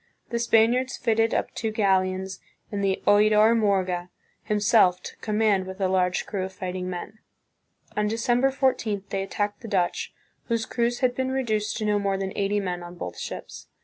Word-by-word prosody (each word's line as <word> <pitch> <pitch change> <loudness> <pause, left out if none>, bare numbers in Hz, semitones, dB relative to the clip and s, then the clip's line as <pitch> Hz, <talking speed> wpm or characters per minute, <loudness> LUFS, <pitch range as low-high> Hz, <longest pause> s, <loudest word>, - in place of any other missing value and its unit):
The 235 - 0
Spaniards 235 +2 +3
fitted 225 -1 +2
up - - -1
two 220 - -2
galleons 190 -2 0 0.3
and 200 -1 -2
the 195 -1 0
Oidor 210 +2 +5
Morga 185 -5 +1 0.3
himself 210 -4 +3
took - - -9
com 210 -1 -2
mand 205 -4 +2
with 190 +1 -8
a 190 - +2
large 180 -1 +1
crew 195 -3 -3
of 190 0 -5
fighting 185 -1 -4
men. 185 +4 -6 0.8
On 210 0 +1
December 240 +4 +2
14, 250 -7 0
they 195 - -1
attacked 205 +1 -3
the 230 - -8
Dutch, 185 -4 0 0.3
whose 230 -2 -1
crews 240 0 -1
had 250 -1 +3
been 260 +1 -1
reduced 220 -5 -1
to 215 - -2
no 210 -1 +2
more 195 -1 0
than 190 0 -4
eighty 205 +1 +1
men 180 -3 -3
on 175 0 -9
both 90 - -6
ships. - - -7
205 Hz, 180 wpm, -25 LUFS, 190-225 Hz, 0.8 s, Oidor